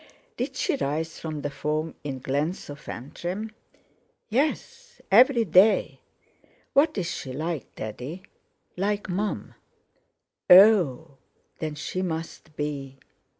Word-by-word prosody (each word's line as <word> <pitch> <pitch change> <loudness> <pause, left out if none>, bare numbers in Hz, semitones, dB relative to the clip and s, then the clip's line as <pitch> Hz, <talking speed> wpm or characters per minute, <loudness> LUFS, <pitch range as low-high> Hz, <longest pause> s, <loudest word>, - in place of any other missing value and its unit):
"Did - - -3
she 355 -8 0
rise 160 - -2
from 155 -3 -5
the 145 - -2
foam 155 +3 -2
in 135 -3 -5
Glensofantrim?" 150 - -4 0.8
"Yes; 305 - -2
every 235 +2 +6
day." 190 +4 +4 0.7
"What 290 -1 +3
is 185 - -1
she 145 -5 -5
like, 160 +1 -4
Daddy?" 125 - -6 0.5
"Like 200 +2 -1
Mum." 200 +4 -2 1.0
"Oh! 180 - +6 0.4
Then 155 -2 -3
she 185 +5 -4
must 160 -3 -5
be..." 140 -3 -4
165 Hz, 105 wpm, -26 LUFS, 145-205 Hz, 1.0 s, every